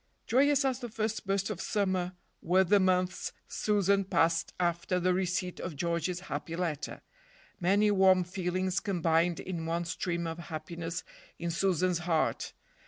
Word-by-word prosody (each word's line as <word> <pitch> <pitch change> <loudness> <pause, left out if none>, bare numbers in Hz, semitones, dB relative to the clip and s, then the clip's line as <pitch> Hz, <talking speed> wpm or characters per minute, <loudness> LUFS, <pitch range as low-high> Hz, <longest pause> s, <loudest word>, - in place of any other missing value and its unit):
Joyous 280 +2 +3
as 260 -2 0
the 240 -2 -5
first 220 -2 -3
burst 195 +1 0
of 190 -3 -5
summer 185 -4 0 0.3
were 185 +3 +4
the 200 +3 +4
months 185 -1 +1 0.2
Susan 200 -2 +2
passed 165 -3 +2
after 175 +1 0
the 180 +1 +2
receipt 180 -1 -1
of 165 - -5
George's 170 +3 -1
happy 170 -3 -5
letter. 165 -4 -3 0.6
Many 200 +4 +3
warm 190 -2 +5
feelings 185 +1 -1
combined 170 -3 +1
in 170 -3 -4
one 170 +1 -1
stream 170 0 -2
of 165 +1 -4
happiness 170 0 -5 0.3
in 170 0 -3
Susan's 180 0 +1
heart. 170 -2 0
180 Hz, 145 wpm, -30 LUFS, 170-195 Hz, 0.6 s, warm